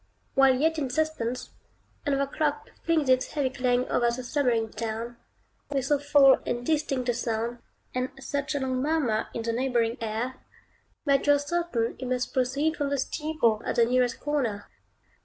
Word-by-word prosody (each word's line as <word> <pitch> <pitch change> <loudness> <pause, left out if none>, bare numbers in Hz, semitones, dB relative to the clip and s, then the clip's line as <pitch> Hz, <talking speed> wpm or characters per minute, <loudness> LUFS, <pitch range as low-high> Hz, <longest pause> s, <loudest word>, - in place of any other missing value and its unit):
While 270 -1 +5
yet 320 +4 +1
in 275 -3 -2
suspense, 255 -4 -2 0.6
another 275 -1 +2
clock 305 - -2
flings 320 -4 +1
its 255 0 +2
heavy 280 -4 0
clang 250 -1 +1
over 240 -1 +2
the 245 +2 -3
slumbering 245 -5 0
town, 230 +2 -4 0.5
with 275 -3 -1
so 290 0 +2
full 285 -2 +6
and 240 0 -3
distinct 285 -4 0
a - - +3
sound, 235 0 -2 0.3
and 255 +1 -1
such 280 +2 -3
a - - +1
long 260 -1 -1
murmur 275 -7 +1
in 230 - -2
the 230 0 -1
neighboring 240 -2 +1
air, 230 +4 -3 0.7
that 280 -1 +2
you 290 - +7
are - - +4
certain 285 -6 -1
it 255 - -4
must 250 0 -1
proceed 275 +5 +1
from 285 -2 -1
the 280 - 0
steeple 270 -6 0
at - - -2
the 235 - +5
nearest 250 +1 +1
corner. 255 -9 -2
260 Hz, 175 wpm, -27 LUFS, 240-290 Hz, 0.7 s, you